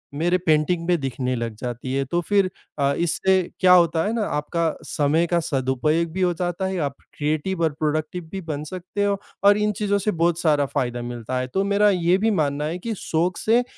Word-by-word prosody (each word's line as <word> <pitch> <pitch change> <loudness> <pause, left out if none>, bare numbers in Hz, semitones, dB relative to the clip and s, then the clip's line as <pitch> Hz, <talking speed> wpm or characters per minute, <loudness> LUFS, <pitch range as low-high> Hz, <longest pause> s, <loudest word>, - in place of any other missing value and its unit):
मेरे 175 +4 +2
पेंटिंग 165 0 +1
में 175 -2 +2
दिखने 130 -1 -2
लग 115 -1 -3
जाती 125 +3 -5
हैं। 135 0 0
तो 175 - +2
फिर 195 +1 +2 0.3
अ, 140 0 +2
इससे 185 +3 +2 0.2
क्या 180 -1 +7
होता 170 -2 +4
है 215 - -1
ना, 230 - -1
आपका 160 +2 -1
समय 155 +4 +1
का 175 0 +2
सदुपयोग 145 +2 0
भी 190 - -2
हो 180 -1 +3
जाता 175 +2 -2
है, 190 0 -2
आप 140 -3 -2 0.2
क्रिएटिव 155 +5 -1
और 160 - +2
प्रोडक्टिव 155 +3 -1
भी 195 - -4
बन 150 -4 -4
सकते 185 +5 -4
हो 200 0 +1 0.3
और 200 +1 +6
इन 210 0 +1
चीज़ों 205 -1 +1
से 200 +2 0
बहुत 170 -1 +1
सारा 150 -4 +2
फ़ायदा 125 -3 -2
मिलता 120 +1 -4
है। 130 - -2
तो 195 - +2
मेरा 200 +1 +3
ये 180 -1 +3
भी 220 +3 +1
मानना 150 -5 0
है 160 +3 -2
कि 230 +5 -3
शौक 170 +2 -1
से 235 +3 +3
170 Hz, 215 wpm, -23 LUFS, 145-185 Hz, 0.3 s, क्या